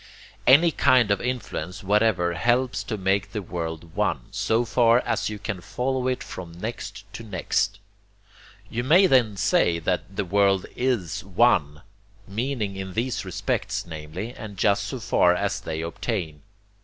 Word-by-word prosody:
Any 160 +6 +7
kind 130 -8 +4
of 100 - +1
influence 100 -6 -4
whatever 100 -3 +2
helps 120 +1 +1
to 110 0 -3
make 95 0 0
the 105 - -2
world 80 -2 -5
one, - - 0
so 115 +2 +1
far 115 0 +4
as - - -1
you 105 - -5
can 100 -3 -5
follow 130 +5 -2
it 130 -1 -1
from 85 -2 -8
next 115 +5 -6
to - - -7
next. 100 0 -1 0.9
You 120 +1 -3
may 170 +9 +6
then 120 - +3
say 85 -2 +2
that 90 +3 -2
'the 100 - -1
world 95 0 +2
IS 120 -10 -1
One' 90 -7 +2 0.4
meaning 110 -1 -2
in 95 -1 -6
these 120 +4 -1
respects, - - -2
namely, 80 +7 -6
and 105 -5 -9
just 100 +1 +2
so 125 +7 -5
far 90 -5 +3
as 100 +2 -1
they 80 -3 -4
obtain. 85 -2 -4
100 Hz, 155 wpm, -25 LUFS, 90-120 Hz, 0.9 s, Any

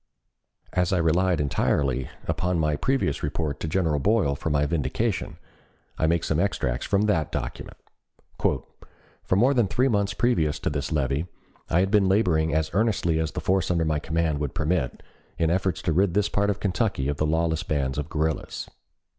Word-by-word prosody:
As 90 -1 +1
I 95 - +2
relied 85 +1 +2
entirely 70 -2 0 0.2
upon 90 +2 0
my 75 -2 +1
previous 130 - 0
report 75 0 -2
to - - -3
General 80 -3 +1
Boyle 100 -4 +2
for 80 - -3
my 75 -1 +2
vindication, 70 -4 -1 0.6
I 80 - +1
make 85 +1 +1
some 80 - 0
extracts 65 -10 -1
from 100 0 +2
that 85 -8 +1
document: - - -5 0.6
"For - - -4
more 125 +8 +4
than 120 -6 +2
three 125 +8 +1
months 100 -3 0
previous 85 -12 +1
to - - -1
this 70 +1 -3
levy, 70 +2 0 0.4
I 85 - +3
had 95 +1 0
been 100 -3 +4
laboring 85 -6 +2
as 80 +1 0
earnestly 95 -6 +1
as 80 -1 -2
the - - -3
force 95 -2 +1
under 85 -2 +1
my 75 -1 0
command 80 -1 -1
would 75 -3 -3
permit, 75 -4 -1 0.3
in 80 -1 +1
efforts 95 -1 0
to 80 - +1
rid 95 +1 +2
this 105 0 +2
part 100 0 +1
of 100 -1 -1
Kentucky 95 - 0
of 70 0 -1
the 75 - +1
lawless 80 0 +1
bands 70 -2 -1
of 75 +2 -4
guerrillas. 80 0 -2
80 Hz, 180 wpm, -25 LUFS, 75-95 Hz, 0.6 s, more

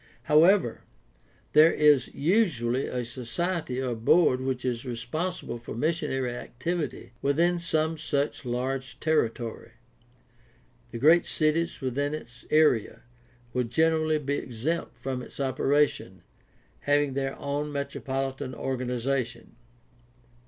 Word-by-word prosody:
However, 160 - +4 0.7
there 155 +2 +7
is 150 -4 +4
usually 145 - +1
a 125 -1 -3
society 130 +4 -3
or 130 -2 -1
board 125 +3 +3
which 130 -1 -2
is 120 -2 -1
responsible 125 +3 -4
for 120 - -8
missionary 135 -3 -1
activity 125 0 -4
within 170 +5 +2
some 160 -1 0
such 145 -2 -1
large 125 0 -3
territory. 120 -7 -1 1.2
The 115 - -6
great 160 +8 +5
cities 160 +2 0
within 140 +3 -1
its 125 -5 -11
area 150 -8 +3 0.5
will 125 -1 +1
generally 155 +4 +2
be 145 -1 -2
exempt 125 +5 -3
from 125 +1 -4
its - - -11
operation, 140 +2 0 0.6
having 145 -1 +1
their 135 0 -2
own 145 +1 -3
metropolitan 135 -2 -3
organization. 125 -2 -3
135 Hz, 110 wpm, -27 LUFS, 125-155 Hz, 1.2 s, there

